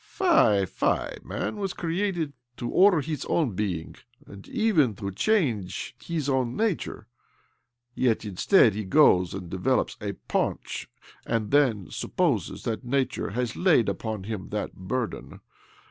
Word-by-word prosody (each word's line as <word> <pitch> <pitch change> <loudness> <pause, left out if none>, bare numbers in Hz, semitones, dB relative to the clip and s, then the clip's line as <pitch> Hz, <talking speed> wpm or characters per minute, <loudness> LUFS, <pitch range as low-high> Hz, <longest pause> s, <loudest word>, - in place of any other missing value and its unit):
" - - -30
Fie, 110 - +3
fie! - - -1
Man - - -4
was 195 -2 -2
created 170 -3 -1 0.2
to 120 - -4
order 185 -4 +5
hii 150 -2 -3
own 155 -8 +2
being, 90 -5 -3 0.3
and 100 0 -12
even 185 - +2
to 100 -1 -5
change 115 - 0
his 160 -4 -3
owr 130 -2 +2
nature; 160 - -2 0.9
yet, 115 -4 +1
instead, 105 - +4
he 105 +2 -3
goes 95 - +4
and 95 -2 -6
develops 95 +9 0
a 100 -1 -3
paunch, - - -2 0.3
and 110 -3 -2
then 120 - +2
supposes - - -1
that 115 +3 -3
nature 130 +2 -1
has 120 +2 -2
laid 165 - +3
upon 110 -3 -3
him 105 -2 -5
that 105 0 -3
burden. 115 +6 -4
120 Hz, 140 wpm, -26 LUFS, 100-160 Hz, 0.9 s, order